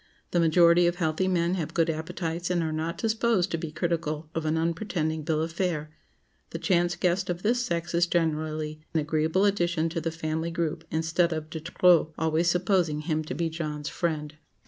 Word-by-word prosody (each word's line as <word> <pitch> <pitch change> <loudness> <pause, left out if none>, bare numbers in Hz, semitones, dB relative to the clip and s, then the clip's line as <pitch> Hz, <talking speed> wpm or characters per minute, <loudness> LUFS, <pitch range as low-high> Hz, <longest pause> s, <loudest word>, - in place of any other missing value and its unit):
The 175 - +2
majority 170 +1 +5
of 175 - +1
healthy 170 +1 0
men 175 -1 +1
have 170 -5 -3
good 165 -1 +3
appetites 165 +2 -3
and 175 -2 +1
are 160 - -1
not 160 +2 -3
disposed 220 -4 +1
to 165 - 0
be 160 -1 -5
critical 155 -1 -2
of 165 -2 -2
an 155 +1 +1
unpretending 160 -1 -1
bill 155 +1 0
of 165 - -4
fare. 165 -4 -2 0.6
The - - -5
chance 175 -2 +1
guest 180 +2 0
of 175 0 -3
this 240 +3 +2
sex 170 -5 -2
is 170 +1 +3
generally 155 -2 -1
an - - +4
agreeable 160 +5 +1
addition 175 -5 +1
to 165 0 -3
the 165 - -1
family 160 0 -3
group, 165 -1 -2
instead 165 +2 +1
of 155 -1 -4
de 160 - -4
trop—always 160 -1 +2
supposing 175 -4 +1
him 155 0 -1
to 130 - -5
be 165 +3 0
John's 150 -2 -4
friend. 155 -3 -3
165 Hz, 190 wpm, -27 LUFS, 155-175 Hz, 0.6 s, majority